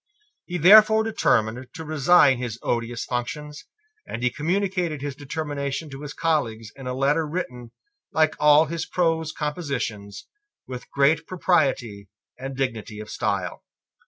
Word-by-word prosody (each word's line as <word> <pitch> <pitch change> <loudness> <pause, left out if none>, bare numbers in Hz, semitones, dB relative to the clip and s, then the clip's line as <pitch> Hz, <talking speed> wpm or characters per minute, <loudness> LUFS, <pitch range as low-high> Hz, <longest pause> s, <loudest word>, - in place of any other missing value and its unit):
He 180 - -3
therefore 215 +5 +7
determined 125 - +1
to 160 -2 -7
resign 150 -3 +4
his 120 -3 -4
odious 120 0 -2
functions; 145 +4 -5 0.4
and 120 - -5
he 125 - +2
communicated 175 -1 -1
his 145 -2 -4
determination 145 0 -4
to 135 +1 -8
his 145 -1 -6
colleagues 120 -10 -1
in 135 -2 -9
a 125 - -3
letter 145 +4 +1
written, 125 -8 -5 0.4
like 155 -1 +3
all 150 +1 +6
his 165 +1 -4
prose 165 -3 0
compositions, 140 - -4 0.4
with 125 -1 -8
great 150 +3 +2
propriety 125 - 0 0.3
and 135 0 -7
dignity 115 -5 -3
of 105 - -8
style. - - -2
145 Hz, 135 wpm, -24 LUFS, 125-160 Hz, 0.4 s, therefore